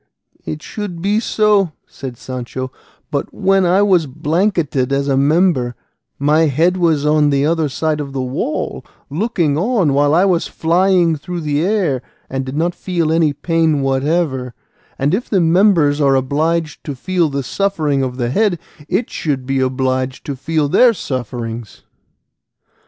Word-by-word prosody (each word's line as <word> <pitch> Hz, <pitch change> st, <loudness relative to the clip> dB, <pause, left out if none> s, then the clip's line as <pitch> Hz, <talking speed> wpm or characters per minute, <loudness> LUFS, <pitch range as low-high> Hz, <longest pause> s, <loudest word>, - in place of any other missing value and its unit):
"It 155 Hz, -1 st, -5 dB
should 205 Hz, -5 st, -6 dB
be 200 Hz, +4 st, +1 dB
so," 210 Hz, -6 st, +2 dB
said 130 Hz, -3 st, -8 dB
Sancho; 130 Hz, +1 st, -6 dB, 0.4 s
"but 140 Hz, -, -2 dB
when 195 Hz, -2 st, +2 dB
I 190 Hz, +3 st, +4 dB
was 180 Hz, -6 st, +3 dB
blanketed 155 Hz, -2 st, 0 dB
as 140 Hz, 0 st, 0 dB
a 135 Hz, -, +2 dB
member, 140 Hz, -3 st, +2 dB, 0.4 s
my 155 Hz, +3 st, +3 dB
head 165 Hz, +6 st, +2 dB
was 165 Hz, -5 st, +1 dB
on 150 Hz, -1 st, +3 dB
the 140 Hz, 0 st, +2 dB
other 160 Hz, -1 st, +1 dB
side 155 Hz, +3 st, -1 dB
of 140 Hz, -2 st, -5 dB
the 135 Hz, -, -4 dB
wall, 135 Hz, -, -3 dB, 0.3 s
looking 165 Hz, -4 st, 0 dB
on 195 Hz, -, +1 dB
while 145 Hz, +2 st, +3 dB
I 180 Hz, +3 st, +4 dB
was 180 Hz, -3 st, +1 dB
flying 175 Hz, 0 st, +2 dB
through 175 Hz, +4 st, -6 dB
the 150 Hz, 0 st, 0 dB
air, 180 Hz, -, 0 dB, 0.3 s
and 135 Hz, 0 st, -2 dB
did 130 Hz, +2 st, -5 dB
not 170 Hz, +2 st, +1 dB
feel 170 Hz, -3 st, -1 dB
any 160 Hz, -2 st, +3 dB
pain 160 Hz, 0 st, 0 dB
whatever; 135 Hz, -2 st, 0 dB, 0.4 s
and 140 Hz, +4 st, 0 dB
if 230 Hz, +6 st, -1 dB
the 195 Hz, -, +2 dB
members 165 Hz, -4 st, +3 dB
are 135 Hz, -1 st, +4 dB
obliged 150 Hz, +4 st, -1 dB
to 145 Hz, -, -4 dB
feel 175 Hz, +3 st, 0 dB
the 140 Hz, -1 st, -3 dB
suffering 155 Hz, -5 st, 0 dB
of 130 Hz, -1 st, -3 dB
the 120 Hz, -1 st, -1 dB
head, 205 Hz, +2 st, +2 dB, 0.3 s
it 195 Hz, +6 st, -1 dB
should 135 Hz, -5 st, -2 dB
be 135 Hz, 0 st, 0 dB
obliged 130 Hz, 0 st, -1 dB
to 140 Hz, -, -4 dB
feel 155 Hz, +2 st, -1 dB
their 235 Hz, -, +4 dB
sufferings." 120 Hz, -, -5 dB
155 Hz, 160 wpm, -17 LUFS, 135-175 Hz, 0.4 s, I